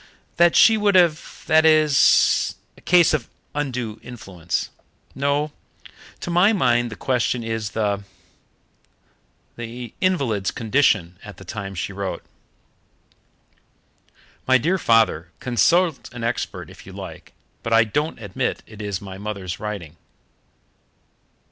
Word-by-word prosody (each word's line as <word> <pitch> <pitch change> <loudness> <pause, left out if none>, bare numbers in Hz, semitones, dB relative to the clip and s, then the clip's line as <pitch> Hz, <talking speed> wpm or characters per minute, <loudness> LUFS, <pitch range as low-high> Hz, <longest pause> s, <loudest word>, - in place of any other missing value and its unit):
"That 175 0 +5
she 225 -1 +7
would 205 -2 +2
have 170 -4 +2
that 160 0 +4
it 160 - +6
is 155 -3 +4 0.2
a - - -19
case 175 -3 +4
of 140 -7 -1 0.2
undue 125 -7 -3
influence. 95 -8 -5 0.4
No, 145 +2 0 0.7
to 175 - -4
my 180 +6 +4
mind 120 - +2
the 110 - -8
question 125 -1 -1
is 115 -2 -4
the 100 -2 0 1.5
the 120 0 -7
invalid's 135 - +1
condition 110 -8 +1
at 105 -3 -11
the 95 - -12
time 100 0 -6
she 95 +3 -4
wrote." 95 -1 -4 2.2
"My 130 0 +6
dear 175 +9 0
father, 110 - +2
consult 160 +6 +1
an 120 - -6
expert 115 +1 -3
if - - -15
you - - -10
like, - - -10 0.3
but 115 - -5
I 115 0 +6
don't 150 +8 -2
admit 100 -4 -3
it 110 -1 -11
is 100 -3 -3
my 95 -1 -9
mother's 100 -3 -5
writing." 100 -7 -6
120 Hz, 130 wpm, -22 LUFS, 105-150 Hz, 2.2 s, she